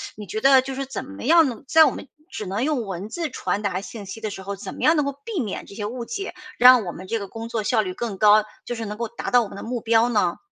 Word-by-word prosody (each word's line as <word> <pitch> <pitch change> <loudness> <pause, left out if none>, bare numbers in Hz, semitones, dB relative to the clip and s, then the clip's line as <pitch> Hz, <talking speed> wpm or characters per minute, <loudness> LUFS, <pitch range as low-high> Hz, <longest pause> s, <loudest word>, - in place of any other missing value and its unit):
你 210 - -8
觉 220 +5 -4
得 270 0 +7
就 270 0 -5
是 275 0 -3
怎 270 - -5
么 95 - -10
样 325 +2 +6
能 235 - -8
在 320 +2 +7
我 - - +2
们 - - -8 0.2
只 210 - -6
能 200 +6 -2
用 280 -7 0
文 190 +2 -5
字 335 0 -3
传 205 - -2
达 190 -1 -1
信 205 0 -9
息 225 +4 -8
的 215 - -2
时 190 - -7
候， 200 +1 -4
怎 195 - -8
么 - - -9
样 320 +2 +5
能 295 - +2
够 280 - -1
避 445 -7 -3
免 210 -6 -4
这 200 - -13
些 205 -1 -4
误 235 +2 -5
解， 400 -3 -5 0.2
让 250 -4 +8
我 175 - -3
们 185 +2 -10
这 230 - -1
个 200 - -6
工 225 +2 -7
作 230 -2 -1
效 220 0 +2
率 185 -3 -4
更 220 -3 -4
高， 210 +1 +6 0.2
就 240 - -4
是 225 -1 -5
能 210 +1 -6
够 235 0 -2
达 235 - -5
到 245 - +6
我 - - -6
们 195 - -10
的 - - -7
目 240 0 -3
标 230 +1 +3
呢？ 195 -7 +1
225 Hz, 330 characters per minute, -23 LUFS, 205-255 Hz, 0.2 s, 让